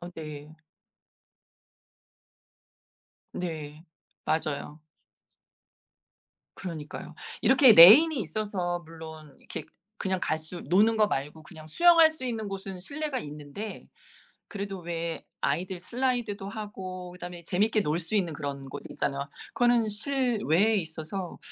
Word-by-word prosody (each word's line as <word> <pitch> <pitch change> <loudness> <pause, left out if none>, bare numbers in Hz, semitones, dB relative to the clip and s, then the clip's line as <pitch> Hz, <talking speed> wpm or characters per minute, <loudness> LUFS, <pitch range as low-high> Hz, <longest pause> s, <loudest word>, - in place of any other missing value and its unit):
아 175 - -7
네. 150 -1 -8 2.8
네. 155 -3 -6 0.4
맞아요. 150 -1 -2 1.8
그러니까요. 160 -5 -7 0.3
이렇게 265 -2 +7
레인이 240 - +10
있어서 180 -1 -2
물론 160 -2 -11
이렇게 - - -7 0.3
그냥 190 -2 -1
갈 155 - 0
수 160 +3 -8
노는 210 +7 +3
거 215 -1 +4
말고 150 +2 -3
그냥 155 -1 -12
수영할 330 - +6
수 315 -5 -7
있는 225 -3 -3
곳은 195 -1 -6
실내가 290 +6 -3
있는데 150 - -8 0.6
그래도 200 -1 -5
왜 170 -1 -4 0.2
아이들 175 +6 -1
슬라이드도 235 -2 -2
하고 190 -3 -7
그다음에 175 -1 -8
재밌게 210 +6 +1
놀 155 -2 0
수 170 +4 -4
있는 185 -6 +1
그런 140 -2 -5
곳 - - -7
있잖아요. 140 +1 -2 0.3
그거는 240 -2 +3
실외에 220 - +1
있어서 165 +1 -5
180 Hz, 255 characters per minute, -28 LUFS, 160-215 Hz, 2.8 s, 레인이